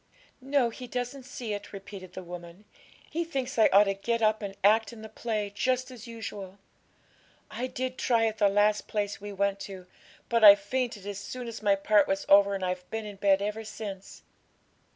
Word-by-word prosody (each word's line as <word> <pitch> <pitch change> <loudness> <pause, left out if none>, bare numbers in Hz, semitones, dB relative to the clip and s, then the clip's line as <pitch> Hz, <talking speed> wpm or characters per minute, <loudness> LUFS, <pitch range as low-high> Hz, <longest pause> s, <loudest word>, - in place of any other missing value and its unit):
'No; 265 -3 +1
he 250 +2 -9
doesn't 250 +2 -4
see 240 -5 -5
it,' 205 0 -6
repeated 195 -2 -10
the 185 - -7
woman; 175 +2 -10 0.5
'he 335 +2 -1
thinks 270 -8 -3
I 220 - +7
ought 200 +2 +7
to 195 -1 0
get 230 +4 -1
up 215 0 +3
and 200 -1 -5
act 215 +1 +4
in 225 -2 -11
the 220 - -8
play, 215 -4 -3
just 255 +4 0
as 240 -1 -11
usual. 205 -4 -7 0.9
I 250 - -3
did 255 0 -4
try 230 -2 +2
at 220 -1 -2
the 205 -2 +5
last 205 +1 +2
place 205 -1 -2
we 205 0 -6
went 200 0 0
to; 195 -2 -8 0.4
but 230 -1 +1
I 200 -1 +12
fainted 210 0 -3
as 200 -1 -5
soon 245 +4 -7
as 230 -1 -7
my 205 -2 +4
part 200 0 +3
was 195 0 -1
over, 200 0 +6
and 190 -1 -2
I've 180 0 -4
been 220 -1 -4
in 205 -1 -8
bed 195 0 +3
ever 210 +2 -3
since.' 205 -3 -8
210 Hz, 200 wpm, -28 LUFS, 200-235 Hz, 0.9 s, I